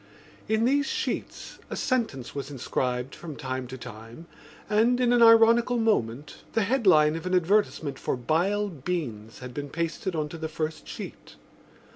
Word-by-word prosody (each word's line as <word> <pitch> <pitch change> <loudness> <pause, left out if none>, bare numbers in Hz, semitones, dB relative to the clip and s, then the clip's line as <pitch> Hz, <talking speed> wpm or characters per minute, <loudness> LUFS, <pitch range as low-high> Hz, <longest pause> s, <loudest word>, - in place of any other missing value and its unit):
In 220 +1 +2
these 285 +3 +2
sheets - - -4
a - - -4
sentence 220 - -1
was 140 -1 -5
inscribed 125 -1 -2
from 160 -4 -8
time 130 -2 -4
to 130 +1 -8
time 115 +4 -10 0.4
and, 230 +4 +3
in 245 -1 +3
an 240 - +4
ironical 230 +1 +6
moment, 150 - 0 0.2
the 225 - +2
headline 185 - +4
of 165 +2 -5
an 185 - +1
advertisement 175 -6 +1
for - - -2
Bile 185 +11 +1
Beans 130 - -4
had 125 -1 -8
been 145 +1 -5
pasted 170 +4 -3
on 155 -1 -1
to 165 - -8
the 160 0 -4
first 155 0 -4
sheet. - - -9
160 Hz, 160 wpm, -27 LUFS, 130-220 Hz, 0.4 s, ironical